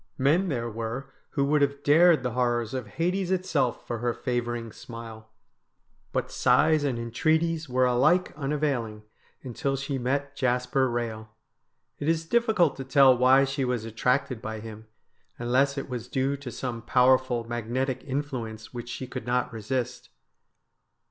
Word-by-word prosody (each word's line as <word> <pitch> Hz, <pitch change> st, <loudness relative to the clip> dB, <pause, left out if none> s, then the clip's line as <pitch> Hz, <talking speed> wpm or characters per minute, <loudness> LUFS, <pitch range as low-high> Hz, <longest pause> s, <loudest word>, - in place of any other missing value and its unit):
Men 160 Hz, +8 st, +2 dB
there 120 Hz, -5 st, -2 dB
were 115 Hz, +4 st, -5 dB, 0.2 s
who 140 Hz, -2 st, +1 dB
would 150 Hz, +1 st, +2 dB
have 140 Hz, 0 st, 0 dB
dared 165 Hz, +2 st, +5 dB
the 125 Hz, -, -1 dB
horrors 120 Hz, -1 st, 0 dB
of 130 Hz, -4 st, -4 dB
Hades 180 Hz, -, -1 dB
itself 180 Hz, -9 st, 0 dB
for 120 Hz, -, -4 dB
her 120 Hz, 0 st, -1 dB
favouring 120 Hz, -2 st, -3 dB
smile. 115 Hz, -1 st, -10 dB, 0.8 s
But -, -, -2 dB
sighs 155 Hz, -1 st, +3 dB
and 135 Hz, -4 st, 0 dB
entreaties 155 Hz, +7 st, 0 dB
were 130 Hz, 0 st, +3 dB
alike 150 Hz, +9 st, +3 dB
unavailing 135 Hz, -7 st, -2 dB, 0.4 s
until 135 Hz, +2 st, -2 dB
she 135 Hz, 0 st, -3 dB
met 140 Hz, +3 st, -2 dB
Jasper 125 Hz, 0 st, +1 dB
Eehel. 115 Hz, -2 st, -3 dB, 0.7 s
It 145 Hz, -, -1 dB
is 165 Hz, 0 st, +1 dB
diffi 230 Hz, +4 st, +1 dB
cult 170 Hz, -7 st, +3 dB
to 135 Hz, -, -4 dB
tell 135 Hz, 0 st, +6 dB
why 130 Hz, +2 st, +5 dB
she 135 Hz, 0 st, -1 dB
was 125 Hz, -3 st, -1 dB
attracted 125 Hz, +2 st, 0 dB
by 110 Hz, 0 st, -5 dB
him, 110 Hz, 0 st, -10 dB, 0.5 s
unless 130 Hz, +4 st, +1 dB
it 135 Hz, -, -4 dB
was 125 Hz, -2 st, -5 dB
due 135 Hz, +2 st, 0 dB
to 140 Hz, -3 st, -8 dB
some 120 Hz, 0 st, -4 dB
powerful 125 Hz, 0 st, +3 dB
magnetic 120 Hz, +3 st, -2 dB
influence 130 Hz, -6 st, -5 dB
which 120 Hz, -1 st, -6 dB
she 130 Hz, -, -5 dB
could 125 Hz, -2 st, -7 dB
not 125 Hz, 0 st, 0 dB
resist. 120 Hz, +3 st, -3 dB
130 Hz, 155 wpm, -27 LUFS, 120-140 Hz, 0.8 s, tell